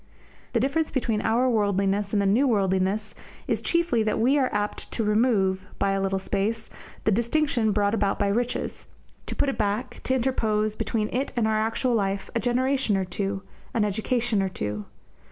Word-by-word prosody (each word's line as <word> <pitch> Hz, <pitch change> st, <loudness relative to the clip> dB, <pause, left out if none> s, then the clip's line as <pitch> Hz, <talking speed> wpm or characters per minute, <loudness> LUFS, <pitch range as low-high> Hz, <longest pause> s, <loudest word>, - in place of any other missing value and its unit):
The 235 Hz, -, +3 dB
difference 280 Hz, +6 st, +1 dB
between 230 Hz, -5 st, 0 dB
our 235 Hz, +4 st, +2 dB
worldliness 200 Hz, -3 st, +1 dB
and 210 Hz, -, +2 dB
the 200 Hz, -, +2 dB
New 230 Hz, +9 st, +4 dB
worldliness 195 Hz, -1 st, +1 dB, 0.3 s
is -, -, 0 dB
chiefly 340 Hz, -9 st, +1 dB
that 215 Hz, 0 st, +1 dB
here -, -, -2 dB
we 265 Hz, +4 st, +4 dB
are 260 Hz, -, +2 dB
apt 210 Hz, 0 st, -3 dB
to 225 Hz, -, -1 dB
remove, 210 Hz, -4 st, +2 dB
by 195 Hz, -, +1 dB
a 195 Hz, 0 st, 0 dB
little 195 Hz, 0 st, 0 dB
space, 205 Hz, +4 st, -2 dB, 0.3 s
the 215 Hz, -, +2 dB
distinction 235 Hz, +1 st, +1 dB
brought 205 Hz, 0 st, +1 dB
about 200 Hz, -3 st, +1 dB
by 200 Hz, -, +1 dB
riches, 240 Hz, +4 st, -2 dB, 0.4 s
to -, -, -4 dB
put -, -, +1 dB
it 275 Hz, -, -2 dB
back, 210 Hz, +4 st, -1 dB
to 260 Hz, -, +2 dB
interpose, 215 Hz, -4 st, 0 dB
between 215 Hz, -1 st, -1 dB
it 265 Hz, +3 st, -1 dB
and 230 Hz, -3 st, +2 dB
our 215 Hz, 0 st, +2 dB
actual 225 Hz, +3 st, 0 dB
life, 195 Hz, -3 st, -1 dB
a 235 Hz, -, +1 dB
generation 255 Hz, -2 st, +1 dB
or 190 Hz, -, 0 dB
two, 195 Hz, +1 st, -3 dB, 0.3 s
an 220 Hz, -3 st, +3 dB
education 220 Hz, +1 st, 0 dB
or 190 Hz, -, 0 dB
two. 105 Hz, -, -4 dB
215 Hz, 190 wpm, -26 LUFS, 200-245 Hz, 0.4 s, New